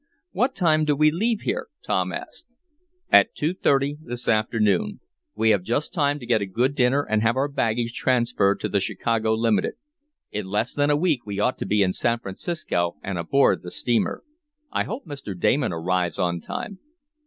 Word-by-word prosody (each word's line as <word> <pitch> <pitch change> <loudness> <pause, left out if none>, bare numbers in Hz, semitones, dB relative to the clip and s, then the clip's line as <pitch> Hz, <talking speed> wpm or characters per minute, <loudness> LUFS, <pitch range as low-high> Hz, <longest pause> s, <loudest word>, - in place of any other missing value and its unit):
"What 260 +2 0
time 155 -4 +3
do 150 -1 +2
we 155 +1 +4
leave 220 +6 0
here?" 440 +6 -2 0.2
Tom - - 0
asked. 245 - -8 0.6
"At - - +6
two 155 +4 0
thirty 140 -4 +1
this 120 -4 -6
afternoon. 110 - +1 0.4
We 110 0 +3
have 100 -3 +3
just 120 +10 -2
time 145 -4 +1
to 130 - -9
get 115 -3 +2
a 100 - -2
good 120 +8 0
dinner 135 +1 +2
and 110 -4 0
have 115 +2 +2
our 135 +2 +1
baggage 115 -4 -1
transferred 115 -6 +1
to - - -1
the 100 - +1
Chicago 110 +2 0
limited. 110 -4 +1 0.6
In 105 -2 -4
less 105 +5 -1
than 145 0 +1
a 145 - +3
week 150 -9 0
we 100 -1 -4
ought 125 +5 +1
to - - -3
be 105 -1 +3
in 95 -1 +1
San 120 +4 +1
Francisco 95 - -3
and 95 -3 -3
aboard 135 +12 +3
the 90 - -8
steamer. 120 +5 -1 0.5
I - - 0
hope 230 +3 -6
Mr. 135 - -7
Damon 135 +6 +2
arrives 90 0 -1
on 85 -1 0
time." 200 - -6
120 Hz, 190 wpm, -24 LUFS, 105-145 Hz, 0.6 s, At